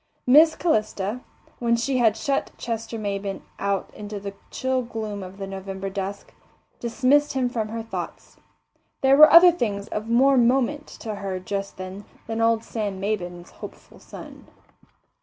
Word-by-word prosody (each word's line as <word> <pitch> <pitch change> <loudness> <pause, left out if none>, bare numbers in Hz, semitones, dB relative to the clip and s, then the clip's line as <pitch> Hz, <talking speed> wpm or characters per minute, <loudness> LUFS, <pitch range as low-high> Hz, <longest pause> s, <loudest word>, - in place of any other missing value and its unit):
Miss 310 +5 +6
Calista, 215 - -1 0.4
when 235 -1 +2
she 255 +3 0
had 225 -3 +3
shut 275 +5 -1
Chester 230 -1 -4
Maybin 200 -2 -4 0.2
out 200 -1 -2
into 210 0 -7
the 200 0 -6 0.2
chill 260 0 -1
gloom 220 -4 -5
of 185 +1 -9
the 195 - -5
November 195 0 -6
dusk, 195 +1 -5 0.5
dismissed 275 +5 +2
him 260 -2 +1
from 225 -3 -2
her 225 +1 -5
thoughts. 225 - -7 0.6
There 270 0 +5
were 305 +2 +9
other 350 +1 +9
things 210 -11 -3
of 215 +2 -4
more 265 +3 +4
moment 265 +5 +2
to 220 - -4
her 195 -2 -4
just 195 +1 -5
then 185 +2 -8 0.2
than 225 0 -3
old 225 0 +2
Sam 205 -4 -4
Maybin's 180 -4 -4
hopeful - - -12
son. - - -12
220 Hz, 155 wpm, -24 LUFS, 200-250 Hz, 0.6 s, were